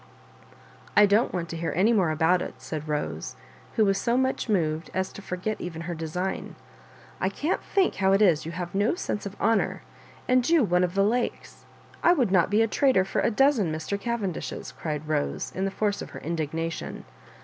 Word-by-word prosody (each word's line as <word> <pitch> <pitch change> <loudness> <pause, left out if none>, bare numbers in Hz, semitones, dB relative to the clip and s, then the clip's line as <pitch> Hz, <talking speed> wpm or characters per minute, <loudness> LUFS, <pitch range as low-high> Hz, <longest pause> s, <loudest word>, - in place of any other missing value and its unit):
" - - -18
I 210 - +9
don't 205 +4 +3
want 175 -2 -3
to - - -5
hear 165 0 -2
any 210 +6 +4
more 190 -7 +3
about 160 +3 +2
it," - - -5
said 155 -1 -6
Bose, 150 -1 -3 0.4
who 220 - +4
was 195 -1 +2
so 235 +3 +1
much 260 -2 0
moved 160 -5 0
as 190 0 -1
to - - -9
for 180 - -4
get 215 +4 -3
even 165 -2 -5
her 175 +1 -4
design. 170 +4 -4 0.6
"I 190 - +1
can't 295 - -1
think. 390 -2 +2
how 190 -1 +3
it 195 - +4
is 175 -8 +4
you 165 - -5
have 175 0 -5
no 205 - +2
sense 205 - -3
of 200 - -10
honour, 225 -2 +1 0.4
and 255 +1 +3
you 330 -4 +5
one 180 -3 +2
of 180 +1 -1
the 195 - +4
Lakes. 235 +4 -2 0.4
I 345 - +6
would 250 - +1
not 180 -3 +4
be 210 +3 +4
a - - +2
traitor 255 -6 +3
for 195 - -1
a - - +2
dozen 235 - +3
Mr. 160 +6 -3
Cavendishes 205 -5 -4
I" - - -20
cried 150 -1 -3
Bose, 150 -2 -1
in 190 - -1
the - - 0
force 205 +1 -1
of - - -7
her - - -9
indignation. 165 +1 -3
190 Hz, 215 wpm, -26 LUFS, 165-220 Hz, 0.6 s, I